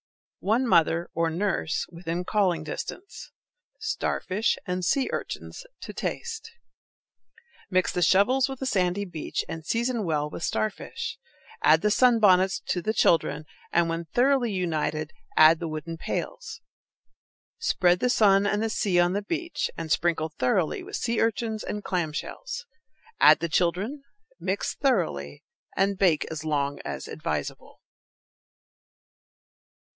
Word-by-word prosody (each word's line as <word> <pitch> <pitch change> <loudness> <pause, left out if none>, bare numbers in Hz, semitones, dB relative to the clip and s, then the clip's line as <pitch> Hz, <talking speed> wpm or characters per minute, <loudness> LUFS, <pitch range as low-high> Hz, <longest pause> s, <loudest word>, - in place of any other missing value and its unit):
One 225 +6 +1
mother, 170 -5 +3
or 165 0 +1
nurse, 175 -1 -1
within 170 0 -4
calling 185 -6 +1
distance. 365 - -7 0.5
Starfish 195 +4 -1
and 180 0 -2
sea 265 +9 +2
urchins - - -5 0.2
to - - -7
taste. 455 -1 -4 1.2
Mix 185 -1 +2
the 180 - -2
shovels 250 - +4
with 270 - -5
the 265 - -3
sandy 195 -4 +1
beach, 165 -5 -4
and 165 0 -6
season 235 +5 -1
well 150 -4 0
with - - -7
starfish. 110 -7 -3 0.4
Add 155 +1 +5
the 210 - +2
sunbonnets 205 -6 +4
to 180 - 0
the 220 +5 -1
children, 155 -5 +2 0.3
and, 170 0 +3
when 165 0 -3
thoroughly 245 - +2
united, 155 -4 -1 0.3
add 155 +1 +7
the 170 - -3
wooden 155 +1 -5
pails. - - -5 1.0
Spread 180 - +2
the 250 - +1
sun 200 -4 +4
and 210 +2 0
the 225 - 0
sea 190 -4 +1
on 175 +1 +3
the 205 - 0
beach, 335 - -3
and 160 -1 -5
sprinkle 160 -2 +1
thoroughly 155 - 0
with 390 +3 -7
sea 230 -1 0
urchins 225 0 -1
and 210 0 -4
clam 175 -4 -1
shells. 485 - -6 0.5
Add - - +8
the 170 - -2
children, 185 - 0 0.4
mix - - -2
thoroughly, 165 - -1 0.3
and 195 0 +1
bake 175 -6 +3
as 160 -1 -5
long 145 -2 -1
as - - -5
advisable. - - -5
185 Hz, 135 wpm, -26 LUFS, 165-225 Hz, 1.2 s, Add